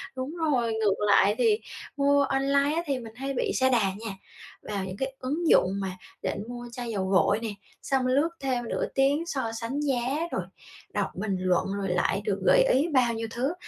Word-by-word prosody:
Đúng 260 +5 -4
rồi, 265 -9 +1
ngược 220 -3 +2
lại 200 0 +5
thì 225 -3 +3 0.4
mua 280 0 +4
online 280 +2 +2
á 335 - +1
thì 275 -4 -1
mình 225 -2 -10
hay 270 +2 -3
bị 250 - 0
sa 260 0 +3
đà 245 -2 +4
nha. 215 +1 -6 0.5
Vào 200 -2 -3
những 185 0 -6
cái 265 +2 -3
ứng 300 +7 -2
dụng 195 +2 +4
mà 190 -1 -2 0.3
định - - -3
mua 240 0 -7
chai 240 0 -5
dầu 200 -4 -1
gội 190 +2 +3
nè, 230 - -3 0.3
xong 265 -2 0
lướt 280 +6 +3
thêm 250 -4 -2
nửa - - -1
tiếng 280 +4 +2
so 265 -9 -2
sánh 245 +5 -2
giá, 275 +3 0
rồi - - -1 0.5
đọc - - -1
bình 200 0 -2
luận, 185 -1 +2
rồi 195 -1 -2
lại 180 +2 +1
được 200 -3 0
gợi - - +6
ý 315 - +3
bao 245 -3 +4
nhiêu 225 0 -3
thứ, 260 +7 -1
250 Hz, 205 wpm, -27 LUFS, 215-275 Hz, 0.5 s, gợi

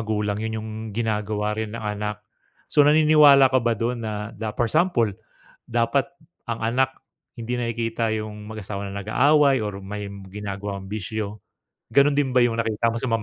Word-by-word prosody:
magulang, 105 -2 -1
'yun 110 0 -3
yung 110 - -6 0.3
ginagawa 105 -2 -1
rin 110 +1 -4
ng 115 - -7
anak. 105 0 -4 0.5
So, - - +5
naniniwala 150 -2 +6
ka 130 - +4
ba 115 -1 +1
do'n 120 +3 -2
na 105 -1 -4
na 110 +2 -5
for 120 - +2
example, 125 - +2 0.5
dapat 120 +7 0 0.4
ang 115 - -3
anak, 125 +4 0 0.4
hindi 120 +2 -3
nakikita 115 -1 -1
yung 110 -1 -4
mag-asawa 100 -2 -5
na 100 - -4
nag-aaway 135 +4 +3
or 105 -2 -4
may 100 +1 -6 0.2
ginagawang 100 0 -6
bisyo. 105 0 -4 0.5
Gano'n 140 +1 +4
din 140 -2 +1
ba 130 - +3
yung 120 -1 +2
nakita 115 -1 0
mo 115 - -3
sa 130 - -1
mga 115 -1 +1
110 Hz, 170 wpm, -24 LUFS, 105-125 Hz, 0.5 s, naniniwala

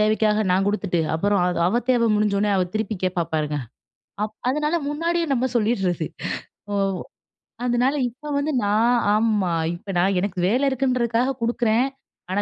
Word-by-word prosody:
தேவைக்காக 215 0 +2
நான் 190 +2 +3
குடுத்துட்டு, 200 -4 0
அப்புறம் 200 +3 +1
அது 180 -1 -1
அவ 220 +7 +2
தேவை 235 -2 +3
முடிஞ்சவுடனே 210 0 +1
அவ 185 - +2
திருப்பி 220 0 -1
கேட்பா 180 -2 0
பாருங்க. 150 -1 -1 0.7
அப் 215 0 -4
அதனால 300 +4 0
முன்னாடியே 335 +3 0
நம்ம 255 0 +1
சொல்லிடுறது. 195 -8 +1 0.7
ஓ! 205 - -1 0.9
அதனால 245 +3 +2
இப்போ 260 +6 -13
வந்து 290 +2 0
நான் 220 +4 +3 0.2
ஆமா, 215 -5 +1 0.2
"இப்போ 195 +3 -8
நான் 190 +2 +2
எனக்கு 190 0 -3
வேலை 250 +7 +2
இருக்குன்றதுக்காக 255 -1 +1
குடுக்குறேன். 235 +1 +2 0.4
ஆனா 200 +2 +1
215 Hz, 145 wpm, -23 LUFS, 195-245 Hz, 0.9 s, நான்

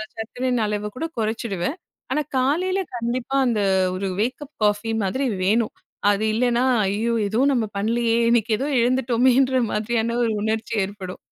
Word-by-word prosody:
சர்க்கரையின் 245 +2 -2
அளவக்கூட 210 +7 -3
குறைச்சிடுவேன். 220 - -2 0.3
ஆனா 300 - +1 0.2
காலையில 345 +9 +1 0.2
கண்டிப்பா 240 +3 -2
அந்த 230 -3 +1 0.4
ஒரு 195 +1 -2
வேக்கப் 265 +5 -3
காஃபி 210 +1 +1
மாதிரி 260 +9 -1 0.2
வேணும். 215 +4 +2 0.4
அது 205 +1 +1
இல்லைனா, 240 +1 +2 0.2
ஐயோ! 215 +4 0
ஏதோ 220 +3 -1
நம்ம 235 -4 +1
பண்ணலையே 230 +2 +1
இன்னைக்கு 235 -1 +2
ஏதோ 270 - -2
எழுந்துட்டோமேன்ற 255 +1 +3
மாதிரியான 225 +2 -1
ஒரு 230 - +1
உணர்ச்சி 220 +1 -2
ஏற்படும். 190 -2 -6
230 Hz, 135 wpm, -23 LUFS, 210-255 Hz, 0.4 s, எழுந்துட்டோமேன்ற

